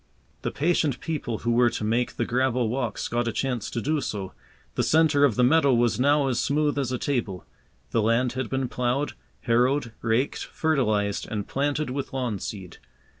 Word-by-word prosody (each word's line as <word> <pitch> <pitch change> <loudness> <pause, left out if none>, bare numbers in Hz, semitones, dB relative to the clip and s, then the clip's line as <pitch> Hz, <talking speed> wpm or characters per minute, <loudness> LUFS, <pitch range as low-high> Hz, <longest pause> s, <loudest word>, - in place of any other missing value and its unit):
The - - -1
patient 150 -4 +1
people 145 -8 -3
who 120 - -1
were 120 +1 +4
to 110 - -4
make 115 +3 0
the 115 - -1
gravel 125 -1 +1
walks 120 -3 -2
got 120 0 -1
a - - +1
chance 125 -2 -2
to - - -3
do 150 +5 0
so. 95 -6 -4 0.4
The - - 0
centre 155 -2 +3
of 135 -7 +4
the 125 - +3
meadow 140 0 +4
was 120 0 +2
now 145 +2 +3
as 125 -2 0
smooth 145 0 +1
as 130 -3 -1
a 125 - 0
table. 115 - -2 0.5
The 115 - +2
land 115 +3 +2
had 130 -3 -3
been 130 -1 -1
ploughed, 125 +4 -1 0.3
harrowed, 125 +2 +2
raked, 115 +4 0
fertilized, 110 -10 0
and 105 -2 -3
planted 145 0 -1
with 135 0 -4
lawn 125 -6 -2
seed. 95 -4 -7
125 Hz, 185 wpm, -25 LUFS, 115-140 Hz, 0.5 s, were